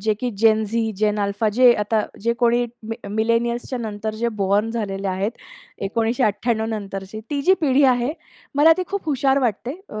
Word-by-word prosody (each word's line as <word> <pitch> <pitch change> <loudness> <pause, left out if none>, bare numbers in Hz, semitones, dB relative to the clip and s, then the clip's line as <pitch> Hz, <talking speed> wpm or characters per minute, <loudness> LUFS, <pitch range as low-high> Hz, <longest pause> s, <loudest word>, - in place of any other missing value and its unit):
जे 215 +2 +1
की 250 - -1
Gen Z, 220 +1 +2
Gen Alpha 210 +1 0
जे 250 +1 +6
आता 215 +1 +1 0.2
जे 235 +3 +1
कोणी 240 0 +3 0.2
मी 225 - -3
मिलेनियर्सच्या 235 +3 0
नंतर 215 -1 -4
जे 235 +2 -1
बॉर्न 200 +3 +2
झालेले 200 -4 -3
आहेत, 190 +3 -1 0.6
1998 225 0 0
नंतरची. 200 -1 -5
ती 285 -1 -1
जी 375 +5 +5
पिढी 285 -3 +3
आहे, 250 +1 +2 0.4
मला 300 +3 +6
ती - - +1
खूप 400 0 -3
हुशार 275 -2 +2
वाटते. 255 - -2
अ, 215 - -6
225 Hz, 160 wpm, -22 LUFS, 210-245 Hz, 0.6 s, जे